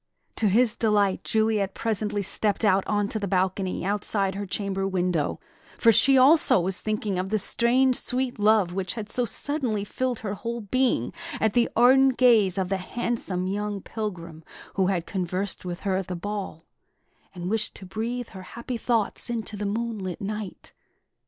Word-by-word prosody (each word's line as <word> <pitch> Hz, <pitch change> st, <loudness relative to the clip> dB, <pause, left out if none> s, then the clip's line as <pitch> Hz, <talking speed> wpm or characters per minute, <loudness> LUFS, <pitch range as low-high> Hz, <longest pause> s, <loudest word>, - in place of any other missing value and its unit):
To 215 Hz, -, +2 dB
his 230 Hz, +3 st, +3 dB
delight, 205 Hz, -4 st, +1 dB
Juliet 215 Hz, -3 st, 0 dB
presently 210 Hz, -2 st, -1 dB
stepped 205 Hz, +3 st, 0 dB
out 195 Hz, -1 st, +4 dB
on 205 Hz, -1 st, +1 dB
to 220 Hz, -, -2 dB
the 200 Hz, -, -3 dB
balcony 185 Hz, 0 st, -1 dB
outside 200 Hz, -1 st, 0 dB
her 200 Hz, +1 st, -5 dB
chamber 195 Hz, 0 st, -2 dB
window; 180 Hz, -5 st, -1 dB, 0.4 s
for 230 Hz, -, +5 dB
she 270 Hz, +5 st, +5 dB
also 275 Hz, -, +6 dB
was 180 Hz, +1 st, -1 dB
thinking 215 Hz, -3 st, -2 dB
of 185 Hz, +1 st, -3 dB
the 215 Hz, -, +1 dB
strange, 245 Hz, +5 st, +2 dB
sweet 250 Hz, -2 st, -2 dB
love 205 Hz, -4 st, +3 dB
which 190 Hz, +1 st, -3 dB
had 215 Hz, -2 st, -6 dB
so 245 Hz, +1 st, 0 dB
suddenly 245 Hz, -4 st, -1 dB
filled 250 Hz, +3 st, -3 dB
her 205 Hz, -3 st, -3 dB
whole 235 Hz, +3 st, -4 dB
being 255 Hz, +5 st, 0 dB, 0.3 s
at 220 Hz, -2 st, +1 dB
the 240 Hz, -1 st, +3 dB
ardent 260 Hz, +2 st, +5 dB
gaze 225 Hz, -7 st, +4 dB
of 185 Hz, -2 st, -1 dB
the 195 Hz, -, 0 dB
handsome 190 Hz, -2 st, -3 dB
young 205 Hz, +1 st, -2 dB
pilgrim 170 Hz, -7 st, -6 dB, 0.3 s
who 190 Hz, -2 st, +1 dB
had 180 Hz, -3 st, -1 dB
conversed 185 Hz, +1 st, -3 dB
with 175 Hz, 0 st, -5 dB
her 190 Hz, -2 st, 0 dB
at 190 Hz, -1 st, -3 dB
the 180 Hz, -, -4 dB
ball, 190 Hz, -3 st, -5 dB, 0.7 s
and 180 Hz, +1 st, -4 dB
wished 220 Hz, -1 st, -1 dB
to 190 Hz, -, -9 dB
breathe 230 Hz, +5 st, -4 dB
her 190 Hz, -, -10 dB, 0.2 s
happy 235 Hz, +1 st, -4 dB
thoughts 230 Hz, 0 st, -1 dB
into 225 Hz, -2 st, -2 dB
the 205 Hz, 0 st, -3 dB
moonlit 210 Hz, -4 st, -3 dB
night. 210 Hz, -1 st, -6 dB
205 Hz, 170 wpm, -25 LUFS, 190-230 Hz, 0.7 s, also